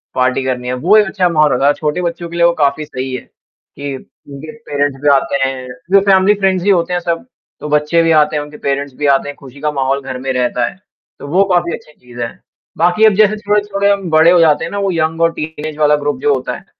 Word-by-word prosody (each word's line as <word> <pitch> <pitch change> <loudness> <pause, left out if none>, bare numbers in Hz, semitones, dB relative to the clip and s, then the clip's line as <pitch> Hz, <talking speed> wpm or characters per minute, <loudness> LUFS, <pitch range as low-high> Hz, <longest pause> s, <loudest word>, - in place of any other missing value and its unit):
party 130 +1 +1
करनी 125 -1 -3
है, 125 - -2
वो 175 +12 +3
एक 210 - +5
अच्छा 190 -2 0
माहौल 155 -3 +3
रहता 135 +3 +1
था, 145 - +4
छोटे 150 +4 -2
बच्चों 170 0 -4
के 170 - -9
लिए 170 0 +3
वो 170 - +4
काफ़ी 150 -1 0
सही 130 -2 -5
है 125 - -5
कि 140 -1 -11
उनके 145 +3 -12
पेरेंट्स 145 -9 -3
भी 145 - +2
आते 140 0 +2
हैं, 130 -1 -6 0.3
वैसे 195 0 +5
हम 190 -1 +4
भी 205 - +5
फ्रेंड्स 190 -2 +1
ही 205 - +1
होते 180 -2 +2
हैं 175 - 0
सब, 170 +4 -3 0.3
तो 150 - -6
बच्चे 150 +3 +2
भी 165 - +2
आते 155 -1 +3
हैं, 145 - -1
उनके 150 0 -12
पेरेंट्स 140 0 -3
भी 150 - -3
आते 140 - -3
हैं, 145 - -7
खुशी 135 0 -14
का 150 0 0
माहौल 135 -1 -1
घर 130 -1 -6
में 130 +1 -3
रहता 125 -1 0
है, - - -14 0.4
तो - - -9
वो 180 +7 +3
काफ़ी 175 -1 +1
अच्छी 150 - -10
चीज़ 120 -1 -14
है, 115 - -3 0.5
बाकी 175 +6 +3
अब 215 - +5
जैसे 215 +1 +3
थोड़े 210 0 +1
थोड़े 200 -1 -1
हम 195 -3 -2
बड़े 160 +2 +5
हो 180 - +5
जाते 160 -1 +3
हैं 165 - -7
ना, 205 - -4
वो 195 -1 0
यंग 165 -1 -1
और 165 0 +3
टीनेज 155 -1 -6
वाला 150 -1 +3
ग्रुप 145 -3 -1
जो 145 - +2
होता 130 -1 -3
है, - - -17
155 Hz, 265 wpm, -15 LUFS, 140-175 Hz, 0.5 s, एक